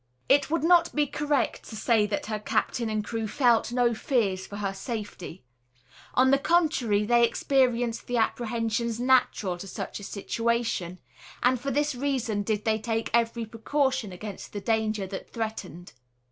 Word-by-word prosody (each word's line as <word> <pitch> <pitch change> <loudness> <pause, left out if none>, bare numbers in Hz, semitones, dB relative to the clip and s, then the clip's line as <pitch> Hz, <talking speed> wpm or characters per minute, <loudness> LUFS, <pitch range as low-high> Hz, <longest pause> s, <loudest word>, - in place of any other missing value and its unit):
It 280 0 +4
would 330 0 0
not 340 0 +4
be 295 0 +3
correct 290 0 -1
to 220 - -8
say 215 -1 +2
that 205 - -2
her 215 -1 -3
captain 230 +2 -1
and 215 -1 -1
crew 225 -1 -3
felt 240 -1 +2
no 240 -1 +2
fears 215 -6 0
for 205 - -8
her 200 -1 -2
safety. 200 -4 -6 0.7
On 260 +1 +5
the 275 - +4
contrary, 275 -11 +2
they 235 +2 +4
experienced 245 -1 +1
the 245 - -1
apprehensions 230 0 -1
natural 245 -7 +2
to 195 - -7
such 190 - -5
a - - -10
situation; 225 -3 -2 0.5
and 250 -1 +3
for 275 - -2
this 295 +1 +1
reason 250 -5 -1
did 210 0 -2
they 220 -1 +2
take 225 0 -2
every 230 0 +1
precaution 260 0 -1
against 200 +2 -8
the 205 - -3
danger 215 -1 0
that 190 0 -7
threatened. 220 - -5
230 Hz, 160 wpm, -27 LUFS, 210-255 Hz, 0.7 s, On